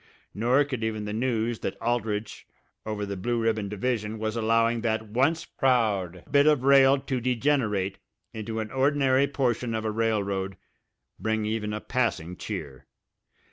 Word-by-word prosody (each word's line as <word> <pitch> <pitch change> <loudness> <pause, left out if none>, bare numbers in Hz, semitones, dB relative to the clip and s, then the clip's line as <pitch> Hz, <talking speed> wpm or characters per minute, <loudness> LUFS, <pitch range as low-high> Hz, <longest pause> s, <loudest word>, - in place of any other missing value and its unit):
Nor 125 +7 +3
could 130 -5 -4
even 110 -1 -2
the 105 - -4
news 115 -1 -1
that - - -4
Aldrich, 115 -3 -2 0.4
over 105 -1 -3
on - - -3
the 100 - -3
Blue 120 +5 -1
Ribbon 110 -3 0
division, 110 +1 -2
was 110 +1 -2
allowing 115 +1 +2
that 110 -1 -1
once 140 +9 +1
proud 105 - 0
bit 140 +1 +5
of 150 -4 +4
rail 135 0 +6
to 130 -2 -2
degenerate 115 -6 0 0.3
into 110 0 -4
an 110 -1 -4
ordinary 135 0 +3
portion 125 -4 -1
of 110 0 -3
a 110 - 0
railroad 100 -4 -1 0.6
bring 110 -1 -1
even 105 -1 -2
a 105 - -3
passing 95 -9 -1
cheer. 70 -5 -7
115 Hz, 155 wpm, -27 LUFS, 105-125 Hz, 0.6 s, rail